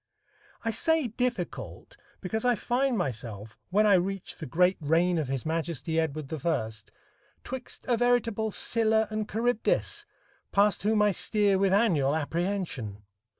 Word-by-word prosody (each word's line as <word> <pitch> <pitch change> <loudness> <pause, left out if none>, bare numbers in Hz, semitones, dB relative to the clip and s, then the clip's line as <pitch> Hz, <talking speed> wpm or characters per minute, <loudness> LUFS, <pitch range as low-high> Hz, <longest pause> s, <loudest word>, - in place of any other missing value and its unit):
I 225 - +1
say 310 +4 +1
"difficult" 235 -5 -4 0.3
because 220 +4 -2
I 245 -1 +3
find 245 +3 0
myself, 110 - -4
when 210 +4 +3
I 205 - +6
reach 190 +1 0
the 155 - -6
great 180 +3 +3
reign 165 +3 +2
of 150 - -2
his 135 -2 -3
Majesty 160 -1 -1
Edward 155 -2 -3
I, 150 -10 0 0.7
'twixt 260 -1 -7
a 240 -2 +2
veritable 230 -2 +1
Scylla 220 +1 +2
and 215 0 -3
Charybdis, 230 +1 0 0.4
past 200 -1 +3
whom 210 +2 +3
I 210 - +4
steer 200 +1 +2
with 195 -1 +3
annual 170 -10 +3
apprehension. 160 - -3
195 Hz, 140 wpm, -28 LUFS, 160-220 Hz, 0.7 s, I